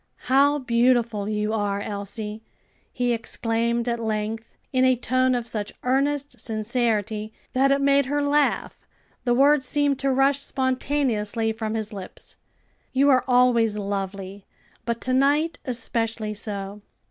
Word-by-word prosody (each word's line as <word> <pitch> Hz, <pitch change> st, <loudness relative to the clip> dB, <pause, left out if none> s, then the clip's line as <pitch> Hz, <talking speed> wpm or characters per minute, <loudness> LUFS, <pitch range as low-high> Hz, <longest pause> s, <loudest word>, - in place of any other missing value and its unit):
"How 280 Hz, +3 st, +4 dB
beautiful 235 Hz, -4 st, +1 dB
you 210 Hz, 0 st, -1 dB
are, 205 Hz, -2 st, -1 dB
Elsie!" 210 Hz, +1 st, -5 dB, 0.5 s
he 245 Hz, -1 st, 0 dB
exclaimed 235 Hz, +1 st, -1 dB
at 235 Hz, -1 st, -1 dB
length, 220 Hz, 0 st, -3 dB, 0.2 s
in 255 Hz, 0 st, +3 dB
a 260 Hz, 0 st, +5 dB
tone 255 Hz, +1 st, +1 dB
of 240 Hz, -1 st, -2 dB
such 215 Hz, -3 st, -3 dB
earnest 280 Hz, +2 st, 0 dB
sincerity 220 Hz, -2 st, -1 dB, 0.2 s
that 270 Hz, +2 st, +3 dB
it 275 Hz, 0 st, +2 dB
made 280 Hz, -1 st, +3 dB
her 290 Hz, +1 st, 0 dB
laugh, 290 Hz, 0 st, +1 dB, 0.5 s
the 240 Hz, -1 st, +3 dB
words 280 Hz, +2 st, +4 dB
seemed 285 Hz, +1 st, +1 dB
to 275 Hz, -, +1 dB
rush 270 Hz, +1 st, +3 dB
spontaneously 255 Hz, -5 st, 0 dB
from 220 Hz, 0 st, -3 dB
his 215 Hz, -1 st, -3 dB
lips. 195 Hz, -2 st, -8 dB, 0.6 s
"You 275 Hz, +2 st, +4 dB
are 255 Hz, -1 st, +4 dB
always 245 Hz, -4 st, +3 dB
lovely, 195 Hz, -1 st, -5 dB, 0.4 s
but 235 Hz, -1 st, -2 dB
to 255 Hz, -, -1 dB
night 290 Hz, +5 st, +2 dB
especially 225 Hz, -3 st, -2 dB
so." 200 Hz, -1 st, -5 dB
235 Hz, 135 wpm, -24 LUFS, 215-265 Hz, 0.6 s, a